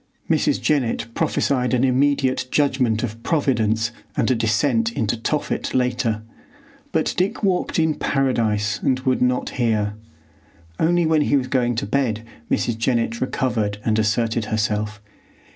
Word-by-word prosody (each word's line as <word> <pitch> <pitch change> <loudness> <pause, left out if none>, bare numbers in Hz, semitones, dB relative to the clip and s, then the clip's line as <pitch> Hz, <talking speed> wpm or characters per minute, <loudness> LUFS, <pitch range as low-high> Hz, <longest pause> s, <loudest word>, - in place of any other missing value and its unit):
Mrs. - - +2
Jennett 130 -6 0
prophesied 125 -1 +1
an 125 - +1
immediate 130 -1 +2
judgment 130 -6 +1
of 115 -1 -5
Providence 115 -6 +1 0.3
and - - +2
a - - +5
descent 115 +1 +1
into 110 0 0
Tophet 135 +6 -2
later, 125 -3 0 0.7
but - - 0
Dick 195 +5 0
walked 185 -3 +1
in 160 -1 +2
Paradise 110 -9 0
and 130 -1 +1
would 130 -1 0
not 125 0 +1
hear. 105 -3 +1 0.9
Only 175 +1 +3
when 160 -1 +3
he 145 - +3
was 130 - -1
going 120 -2 +1
to 115 - -2
bed 115 -1 0 0.3
Mrs. 115 -2 0
Jennett 115 -1 0
recovered 115 -6 -1
and 110 -1 +2
asserted 115 +1 +1
herself. 105 0 -1
120 Hz, 140 wpm, -22 LUFS, 110-135 Hz, 0.9 s, a